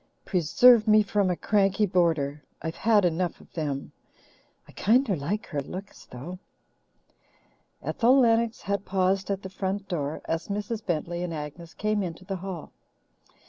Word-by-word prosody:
Preserve 215 +6 +5
me 215 0 +6
from 200 -1 +1
a 180 - +1
cranky 200 +2 +2
boarder! 160 -6 +1 0.2
I've 160 0 -4
had 215 -2 +4
enough 175 +1 -1
of - - -19
them. 145 -4 -3 0.8
I - - -14
kinder 230 -1 +2
like 170 +9 -3
her 145 -4 -3
looks, 190 +8 -9
though." 165 +9 -8 1.4
Ethel 255 +3 +3
Lennox 230 -2 +2
had 200 -1 -1
paused 190 0 0
at 195 0 -2
the 190 - -6
front 195 +1 -3
door 155 -5 -3
as 165 0 -2
Mrs. 210 +2 -3
Bentley 175 -1 -2
and 175 -2 -3
Agnes 155 +3 -8
came 215 0 0
into 180 0 -5
the 195 0 -3
hall. 185 -3 -7
190 Hz, 150 wpm, -27 LUFS, 165-210 Hz, 1.4 s, me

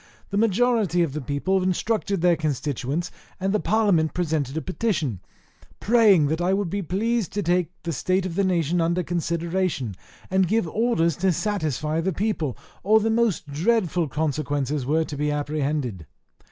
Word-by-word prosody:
The 200 - -1
majority 215 -4 +2
of 155 -5 -2
the 150 - -3
people 145 +9 0
instructed 195 +1 0
their 175 -1 +4
constituents, 150 +1 -2 0.3
and 190 +1 0
the 210 - +2
parliament 200 -9 +2
presented 155 -5 -1
a - - -1
petition, 180 - -1 0.6
praying 210 -8 +5
that 160 +4 -1
I 180 +2 +2
would 195 -4 -2
be 200 - -1
pleased 210 +4 -1
to 205 - -1
take 175 -1 +1
the 170 - -2
state 185 +6 0
of 185 - -3
the 200 +3 +1
nation 175 -2 +1
under 170 +2 +1
consideration, 170 - -1 0.4
and 190 -1 +3
give 220 -2 +1
orders 170 - +1
to 190 +1 +2
satisfy 155 - -1
the 190 +2 -1
people, 165 - -1 0.2
or 215 +4 +4
the 220 +1 0
most 230 -6 +1
dreadful 175 0 +1
consequences 145 -2 -2
were 160 +3 +2
to 150 - -6
be 150 +1 -1
apprehended. 145 - -2
175 Hz, 165 wpm, -24 LUFS, 150-200 Hz, 0.6 s, praying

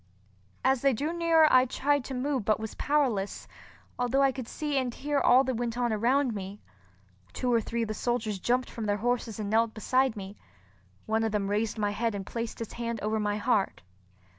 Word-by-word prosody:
As 265 -2 +3
they 275 -1 +3
drew 295 +8 -2
nearer 330 -2 +5
I 255 0 +7
tried 285 +2 0
to 265 - -5
move 260 -1 -1
but 215 +1 +1
was 220 -1 -5
powerless, 255 -10 0 0.5
although 245 +3 +2
I 270 - +4
could 255 -3 -7
see 295 +1 -3
and 260 -2 0
hear 285 +4 -1
all 260 0 +5
that 260 -1 -1
went 235 0 -3
on 240 -2 +1
around 245 +4 +2
me. 200 0 -6 0.7
Two 250 -1 0
or 230 - +3
three 230 +2 -2
of - - -3
the 215 - -3
soldiers 220 -3 -2
jumped 250 +5 +1
from 225 -2 -5
their 205 0 +1
horses 235 -1 -1
and 205 -1 -3
knelt 225 0 +2
beside 255 +2 +1
me. 195 +1 -8 0.7
One 220 +1 +1
of 225 - 0
them 200 -1 -1
raised 215 +2 0
my 205 -1 0
head 225 +1 -1
and 195 -1 -5
placed 230 +1 -5
his 230 - -6
hand 235 -1 -3
over 215 +1 0
my 210 0 0
heart. 215 - 0
235 Hz, 210 wpm, -28 LUFS, 215-260 Hz, 0.7 s, I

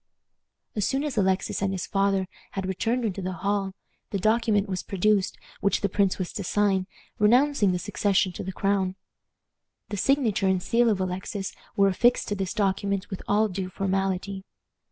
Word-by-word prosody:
As 210 - 0
soon 270 +7 0
as 295 -4 -3
Alexis 190 -3 +1
and 195 -1 +1
his 190 -2 -3
father 195 -1 +1 0.3
had 195 -1 -3
returned 225 +6 0
into 195 -2 -2
the 185 0 -3
hall, 195 +1 -1 0.3
the 200 - -1
document 215 0 +2
was 185 -2 -2
produced 200 0 +1 0.2
which 200 - +1
the 200 - +1
prince 195 0 +1
was 185 -2 -4
to 205 - -4
sign, 190 -1 +1 0.3
renouncing 240 0 +4
the 180 - 0
succession 195 0 +1
to - - -6
the 190 - -4
crown. 190 -1 0 0.9
The 205 - -3
signature 240 -5 +2
and 190 0 +3
seal 230 +5 +2
of 205 -3 +1
Alexis 190 +2 -3 0.2
were 200 0 +5
affixed 235 +6 +3
to 205 - 0
this 190 -3 -3
document 200 0 0
with 190 - -5
all 215 +2 +3
due 185 -1 -4
formality. 195 0 -1
195 Hz, 175 wpm, -26 LUFS, 190-210 Hz, 0.9 s, were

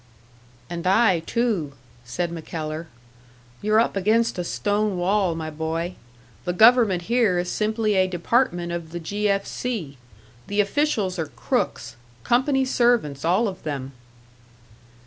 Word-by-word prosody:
"And 170 +3 -4
I, 195 -2 +4
too," 195 - -1 0.3
said 165 +9 -3
MacKellar. 160 -1 -5 0.7
"You're 215 +1 +3
up 230 - +1
against 215 +2 +1
a - - 0
stone 205 +2 -1
wall, 185 -1 +1
my 160 -1 -5
boy. 160 +3 -3 0.5
The 180 - -2
government 220 -3 +5
here 225 -3 +2
is 175 0 -1
simply 215 0 0
a 190 -1 +3
department 175 -1 0
of 170 -1 -5
the 175 - -3
'G. 205 +5 -1
F. 195 0 +1
C.' 175 - -4 0.5
The 205 +1 -2
officials 205 - +1
are 160 - -1
crooks 120 -2 -2 0.3
company 265 +2 +2
servants, 235 - +1
all 185 +8 +2
of 190 -2 -6
them." 140 -3 -4
185 Hz, 135 wpm, -23 LUFS, 165-220 Hz, 0.7 s, government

